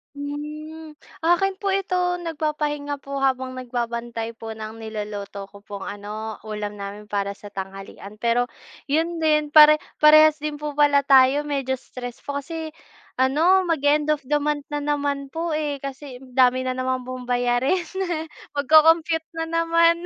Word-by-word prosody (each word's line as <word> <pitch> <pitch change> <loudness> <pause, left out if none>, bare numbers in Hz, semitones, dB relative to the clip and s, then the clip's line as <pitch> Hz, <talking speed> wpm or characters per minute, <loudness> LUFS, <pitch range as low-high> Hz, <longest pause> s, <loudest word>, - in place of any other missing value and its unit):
Hmm, 300 +2 -7 0.2
'akin 360 +4 +2
po 400 - -3
ito 365 -2 0
nagpapahinga 295 -2 -2
po 275 0 -4
habang 260 -1 0
nagbabantay 235 -2 -4
po 225 -1 -6
ng 220 +1 -8
niluluto 205 -2 -6
ko 200 - -13
pong 200 -2 -7
ano, 210 +2 -6
ulam 210 -1 -5
namin 205 +1 -8
para 200 0 -1
sa 205 0 -12
tanghalian 195 +1 -8
pero, 235 +2 +1 0.4
'yun 325 +4 0
din 305 -2 +2
pare 305 0 +9 0.2
parehas 310 0 +7
din 300 0 -3
po 300 0 -5
pala 285 -1 +4
tayo 270 +2 +5
medyo 275 -3 -1
stress 245 -1 -9
po 285 0 -3
kasi 320 +2 -6 0.5
ano 320 +9 +4
mag-e-end 300 -2 +2
of 300 - -5
the 295 - +3
month 295 0 -1
na 295 - -2
naman 285 -1 -1
po, 330 +1 -2
eh. 300 -3 -2
Kasi 275 -2 -8
dami 255 -1 +2
na 255 0 -3
naman 255 0 -1
pong 255 0 -7
bayarin 245 +7 +1 0.7
mag-co-compute 320 +3 +4
na 325 0 -3
naman. 335 +1 +3
285 Hz, 150 wpm, -23 LUFS, 245-310 Hz, 0.7 s, pare